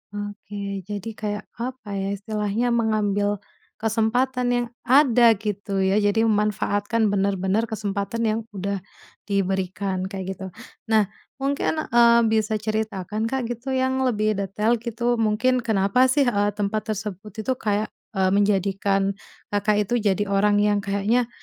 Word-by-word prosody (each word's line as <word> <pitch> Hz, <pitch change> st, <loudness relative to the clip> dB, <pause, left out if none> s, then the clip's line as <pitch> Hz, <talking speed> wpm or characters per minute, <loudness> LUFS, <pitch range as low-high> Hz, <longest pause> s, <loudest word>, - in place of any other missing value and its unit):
Oke, 205 Hz, 0 st, -7 dB, 0.3 s
jadi 205 Hz, +1 st, -4 dB
kayak 210 Hz, -1 st, -3 dB, 0.2 s
apa 235 Hz, -5 st, -4 dB
ya, 195 Hz, -, -2 dB
istilahnya 210 Hz, +3 st, -1 dB
mengambil 205 Hz, -3 st, +1 dB, 0.3 s
kesempatan 245 Hz, +4 st, 0 dB
yang 245 Hz, 0 st, +1 dB, 0.2 s
ada 245 Hz, -4 st, +6 dB
gitu 200 Hz, -1 st, -2 dB
ya, 190 Hz, +2 st, +3 dB
jadi 205 Hz, +2 st, +2 dB
memanfaatkan 210 Hz, 0 st, +1 dB
bener-bener 195 Hz, +2 st, +1 dB
kesempatan 210 Hz, +1 st, -3 dB
yang 220 Hz, 0 st, +1 dB, 0.2 s
udah 200 Hz, +1 st, -2 dB, 0.5 s
diberikan, 190 Hz, -1 st, -1 dB
kayak 190 Hz, -2 st, -5 dB
gitu. 190 Hz, +1 st, -8 dB, 0.4 s
Nah, 215 Hz, -2 st, +3 dB, 0.3 s
mungkin, 280 Hz, +3 st, -1 dB
eee, 235 Hz, 0 st, +6 dB
bisa 220 Hz, 0 st, +1 dB
ceritakan 215 Hz, -1 st, -2 dB
Kak 255 Hz, -2 st, -2 dB
gitu, 240 Hz, +3 st, -5 dB
yang 260 Hz, 0 st, +1 dB
lebih 215 Hz, -3 st, +1 dB
detail 210 Hz, +4 st, 0 dB
gitu, 235 Hz, +1 st, -1 dB
mungkin 225 Hz, +4 st, +2 dB
kenapa 220 Hz, +2 st, +3 dB
sih, 280 Hz, +2 st, +3 dB
eee, 205 Hz, -4 st, +2 dB
tempat 215 Hz, +2 st, -2 dB
tersebut 205 Hz, -1 st, -4 dB
itu 260 Hz, -, +1 dB
kayak, 215 Hz, -3 st, -1 dB, 0.3 s
eee, 190 Hz, -1 st, +3 dB
menjadikan 195 Hz, -1 st, +1 dB, 0.4 s
Kakak 210 Hz, 0 st, +2 dB
itu 220 Hz, -, -3 dB, 0.2 s
jadi 200 Hz, +2 st, +1 dB
orang 205 Hz, +1 st, +2 dB
yang 205 Hz, 0 st, +2 dB
kayaknya, 205 Hz, +4 st, +1 dB
210 Hz, 135 wpm, -24 LUFS, 200-230 Hz, 0.5 s, ada